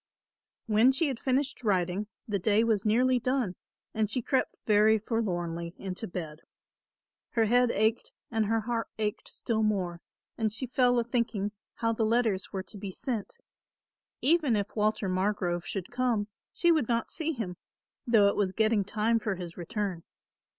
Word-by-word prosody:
When 225 +3 +5
she 285 +3 +1
had 255 -4 -4
finished 270 0 0
writing 190 -1 +1 0.2
the 205 -2 -1
day 210 +3 +3
was 220 -3 +1
nearly 250 +3 +3
done 250 -6 0 0.4
and 215 -1 0
she 250 +2 -2
crept 260 +2 0
very 215 +1 +5
forlornly 175 -7 -2
into 195 +3 -5
bed. 160 -4 -6 0.9
Her 230 -2 +3
head 245 +2 +4
ached 220 +1 +1 0.2
and 220 -2 +1
her 225 +1 +1
heart 230 +1 -2
ached 210 -1 -2
still 220 -2 -2
more 185 -5 0 0.4
and 220 -1 +1
she 230 +5 -3
fell 245 0 +3
a 235 - +3
thinking 225 -4 -1 0.2
how 230 -1 0
the 225 - 0
letters 220 -3 +1
were 190 -2 -3
to 205 - -11
be 200 0 -5
sent. 230 - -4 0.9
Even 300 -5 +3
if 205 -1 -2
Walter 215 -1 +1
Margrove 185 -2 0
should 195 0 -4
come 245 -4 0 0.2
she 345 - +3
would 310 -8 +2
not 230 -1 0
see 325 0 -1
him, 195 - -5 0.5
though 220 -4 +6
it 200 - +2
was 190 -2 0
getting 220 -1 +2
time 215 +3 +1
for 210 -3 -2
his 175 -2 -7
return. 185 0 -3
215 Hz, 165 wpm, -29 LUFS, 195-235 Hz, 0.9 s, though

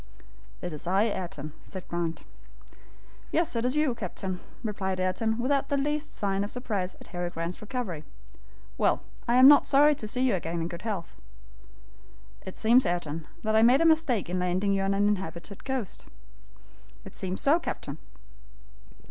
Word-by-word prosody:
"It 175 -2 -4
is 150 +3 -6
I, 190 +3 +3
Ayrton!" 170 -8 -3
said 185 -2 -8
Grant 170 -1 -3 1.1
"Yes, 330 -5 +2
it 230 +1 0
is 255 +3 +2
you, 300 -4 +2
captain," 185 -3 -4 0.2
replied 190 -4 -2
Ayrton, 220 +5 0
without 275 +3 +1
the 285 - +1
least 295 +2 -1
sign 195 -1 0
of 205 - -4
surprise 210 -7 -3
at - - -13
Harry 175 -1 -3
Grant's 170 +1 -5
recovery. 210 - -4 0.8
"Well, - - +2 0.2
I 235 - +3
am 255 +1 +9
not 290 0 +7
sorry 290 +2 +6
to 225 -6 -5
see 250 +4 0
you 240 - +2
again 170 -2 -2
in 165 - -1
good 170 -1 -7
health." 205 -7 -4 1.3
"It 190 - -8
seems, 240 +3 +5
Ayrton, 165 -3 -2 0.2
that 215 0 +1
I 220 - +6
made 245 +4 +6
a - - +4
mistake 315 - +3
in 180 +1 -2
landing 185 +3 +1
you 195 - +1
on 195 0 +1
an 205 +1 +3
inhabited 190 -1 -3
coast." 260 -7 -3 1.0
"It - - -10
seems 185 0 -3
so, 300 +5 +4
captain." - - -5
205 Hz, 170 wpm, -28 LUFS, 180-250 Hz, 1.3 s, am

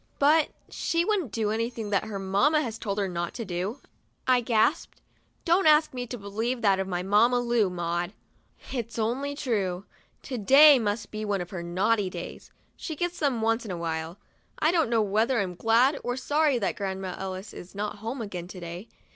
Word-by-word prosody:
" - - -39
But 300 +2 +4 0.2
she 335 +1 -1
wouldn't 380 - 0
do 215 -2 -1
anything 225 -1 -3
that 200 0 +1
her 215 -2 -5
mamma 200 +12 +2
has 225 -4 -5
told 200 -2 -3
her 200 -2 0
not 175 -1 -4
to 230 - -4
do," 185 +7 -4 0.4
I 255 -1 +4
gasped. 230 +6 +1 0.2
" - - -41
Don't 345 0 +3
ask 305 -1 +5
me 245 -1 -4
to 245 - -5
believe 225 +4 -3
that 195 -2 +4
of 190 - -2
my 180 -1 -2
Mamma 220 +6 +4
Lu, 235 -4 +2
Maud!" 175 0 -2 0.6
"It's 235 -3 -4
only 255 +6 -1
too - - -7
true. 190 -3 -1 0.4
To 255 - -5
day 275 +6 +8
must 210 -1 -2
be 215 0 -4
one 205 -2 -1
of 175 0 -6
her 180 -3 -5
naughty 190 +4 +1
days; 175 -1 -8 0.3
she 320 - -6
gets 350 +3 -3
them 265 -7 0
once 225 +1 +1
in 220 - -8
a 180 - -3
while. 165 +1 -4 0.4
I 310 - +3
don't 330 -7 +2
know 230 -2 +3
whether 220 +5 +1
I'm 190 -3 -1
glad 230 - +3
or 245 +1 -2
sorry 290 +1 +2
that 205 - -1
Grandma 190 -2 -3
Ellis 190 +1 -6
is 180 +2 -11
not 210 +1 -3
home 230 +4 -4
again, 180 -4 -6
to 185 0 -9
day. 175 +4 -7
220 Hz, 205 wpm, -27 LUFS, 190-255 Hz, 0.6 s, day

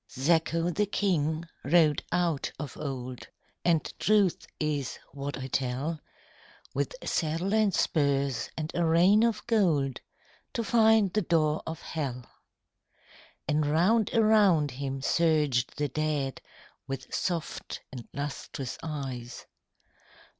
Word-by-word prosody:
Zacho 165 +5 +1
the 205 +4 0
King 165 -6 0 0.2
rode 155 0 +4
out 170 -5 0
of 145 -4 -6
old 130 -4 -5 0.4
(And 165 -3 +2
truth 205 -4 +2
is 145 -4 -1
what 140 0 -5
I 130 - -5
tell) 135 +5 -2 0.7
With - - -2
saddle 165 +5 0
and 215 -2 +3
spurs 140 -6 +1
and 155 +1 -3
a 175 - +1
rein 175 +6 +5
of 230 -1 +1
gold 165 - +2 0.5
To 235 - -1
find 220 -3 +4
the 215 - +2
door 155 -4 +1
of 160 -1 -5
Hell. 130 -6 -4 1.2
And 150 +1 +2
round 190 +9 +3
around 205 -9 +4
him 135 +1 -4
surged 150 -7 +2
the 145 -1 0
dead 145 -2 -1 0.5
With 135 -1 -6
soft 170 -4 -3
and 125 -3 -8
lustrous 140 -2 -5
eyes. 135 -6 -5
155 Hz, 120 wpm, -28 LUFS, 140-175 Hz, 1.2 s, rein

